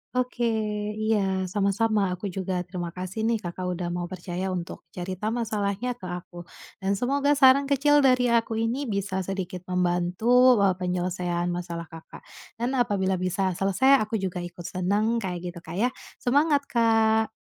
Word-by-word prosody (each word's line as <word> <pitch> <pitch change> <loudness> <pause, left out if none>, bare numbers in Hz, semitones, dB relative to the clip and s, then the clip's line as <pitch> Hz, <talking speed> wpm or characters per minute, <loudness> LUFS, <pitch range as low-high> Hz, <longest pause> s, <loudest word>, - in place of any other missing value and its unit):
Oke, 250 -1 -1 0.6
iya, 195 -4 +1
sama-sama, 205 +3 +1
aku 180 +3 -4
juga 190 -1 -2
terima 175 -2 -5
kasih 185 +5 -5
nih 225 0 +1
Kakak 180 -1 -6
udah 180 0 -3
mau 175 +1 -4
percaya 185 +1 -4
untuk 180 -1 -5
cerita 185 +4 -4
masalahnya 220 0 -2
ke 230 - -29
aku. 175 -1 -7 0.4
Dan 195 0 0
semoga 280 +3 +1
saran 275 -1 +6
kecil 285 +1 +3
dari 255 -2 +4
aku 230 -1 +1
ini 235 +5 -1
bisa 195 -1 -2 0.5
membantu, 180 +8 +3
eee, 195 -2 +3
penyelesaian 180 -1 -2
masalah 175 -1 -4
Kakak. 165 -1 -12 0.4
Dan 245 +3 -1
apabila 200 -6 +1
bisa 185 0 -1
selesai 200 +8 +4
aku 215 0 -2
juga 185 -2 -3
ikut 175 0 -8
senang, 205 +5 0
kayak 185 -6 -3 0.2
gitu - - -7
Kak 170 +4 -6
ya. 240 - +3 0.3
Semangat 285 +2 +2
Kak! 225 -1 +3
195 Hz, 150 wpm, -26 LUFS, 180-235 Hz, 0.6 s, saran